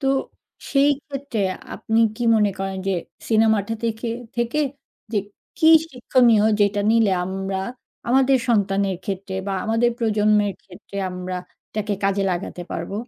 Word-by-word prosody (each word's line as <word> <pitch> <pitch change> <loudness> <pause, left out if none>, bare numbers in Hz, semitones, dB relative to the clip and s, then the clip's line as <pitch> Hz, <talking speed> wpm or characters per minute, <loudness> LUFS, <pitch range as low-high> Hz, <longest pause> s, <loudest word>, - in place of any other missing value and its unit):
তো 270 - -2 0.7
সেইক্ষেত্রে 280 -3 0 0.3
আপনি 225 +1 -1 0.2
কী 240 - -4
মনে 210 -1 +3
করেন 195 0 -3
যে, 195 - +2 0.4
সিনেমাটা 220 -1 +3
থেকে, 225 +1 -2 0.3
থেকে 240 +5 0 0.5
যে, 210 - +2 0.4
কী 315 - +3 0.2
শিক্ষণীয়? 245 -3 +3 0.2
যেটা 205 0 +3
নিলে 225 -3 +4
আমরা 190 +1 -3 0.5
আমাদের 265 +2 +4
সন্তানের 195 -3 +1
ক্ষেত্রে 195 -2 -4
বা, 200 - -1
আমাদের 225 +2 +2
প্রজন্মের 210 -2 +2
ক্ষেত্রে 195 +1 -12
আমরা 180 0 -5 0.4
এটাকে 210 -1 -2
কাজে 195 0 +2
লাগাতে 175 0 -4
পারবো? 170 +4 -4
215 Hz, 130 wpm, -22 LUFS, 195-235 Hz, 0.7 s, নিলে